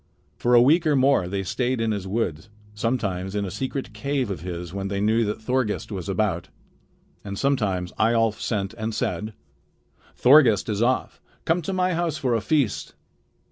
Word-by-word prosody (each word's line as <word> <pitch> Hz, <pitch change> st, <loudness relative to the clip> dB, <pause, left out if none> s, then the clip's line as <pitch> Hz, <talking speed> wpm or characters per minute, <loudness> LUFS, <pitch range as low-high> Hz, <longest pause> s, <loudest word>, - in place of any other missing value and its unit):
For 120 Hz, 0 st, +2 dB
a 120 Hz, -, +8 dB
week 160 Hz, +5 st, +4 dB
or 150 Hz, -, +3 dB
more 135 Hz, -8 st, +3 dB
they 95 Hz, +1 st, -2 dB
stayed 125 Hz, +6 st, -1 dB
in 115 Hz, -1 st, 0 dB
his 100 Hz, -3 st, -3 dB
woods, 95 Hz, -4 st, -2 dB, 0.2 s
sometimes 105 Hz, -4 st, -2 dB
in 100 Hz, -1 st, -1 dB
a 95 Hz, -, -5 dB
secret 130 Hz, +3 st, -4 dB
cave 130 Hz, +1 st, -2 dB
of 90 Hz, -, -4 dB
his 85 Hz, -1 st, -6 dB
when 100 Hz, 0 st, -3 dB
they 100 Hz, 0 st, -2 dB
knew 110 Hz, +3 st, +2 dB
that 105 Hz, +1 st, -3 dB
Thorgest 115 Hz, -2 st, -1 dB
was 95 Hz, -1 st, -5 dB
about. 95 Hz, -4 st, -1 dB, 0.7 s
And 100 Hz, -1 st, -6 dB
sometimes 100 Hz, -10 st, 0 dB
Eyjolf 115 Hz, -1 st, +2 dB
sent 100 Hz, -4 st, -2 dB
and 110 Hz, 0 st, -3 dB
said: 110 Hz, 0 st, -2 dB, 0.8 s
"Thorgest 125 Hz, -6 st, +5 dB
is 105 Hz, 0 st, -1 dB
off. 125 Hz, +2 st, 0 dB, 0.2 s
Come 165 Hz, +2 st, +2 dB
to 170 Hz, -, -4 dB
my 185 Hz, 0 st, +1 dB
house 165 Hz, -2 st, -1 dB
for 130 Hz, -3 st, 0 dB
a 115 Hz, -, +1 dB
feast." 140 Hz, -4 st, 0 dB
110 Hz, 180 wpm, -24 LUFS, 100-130 Hz, 0.8 s, a